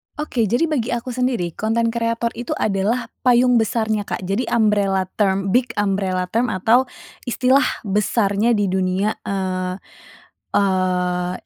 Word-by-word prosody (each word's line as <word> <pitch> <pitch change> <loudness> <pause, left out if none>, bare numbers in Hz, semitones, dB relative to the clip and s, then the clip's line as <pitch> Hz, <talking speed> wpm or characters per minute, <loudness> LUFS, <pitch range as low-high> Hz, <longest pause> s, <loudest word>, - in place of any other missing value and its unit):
Oke, 260 -7 -1
jadi 240 +10 +1
bagi 250 -6 0
aku 240 +1 -5
sendiri, 245 -8 -1
konten 230 +3 0
kreator 230 0 -1
itu 240 +1 -4
adalah 220 +4 -1 0.2
payung 245 0 +5
besarnya 220 -2 -1
Kak, - - -4
jadi 195 +7 -1
umbrella 205 -4 +2 0.2
term 195 -1 +1
big 250 +3 +2
umbrella 195 -2 0
term 235 +3 +1
atau 230 +7 +2 0.4
istilah 260 +2 +3 0.2
besarnya 210 +2 +1
di 205 - +1
dunia, 190 +2 0
eee 185 -2 -2 0.8
eee, 180 -2 +1
210 Hz, 130 wpm, -20 LUFS, 190-235 Hz, 0.8 s, payung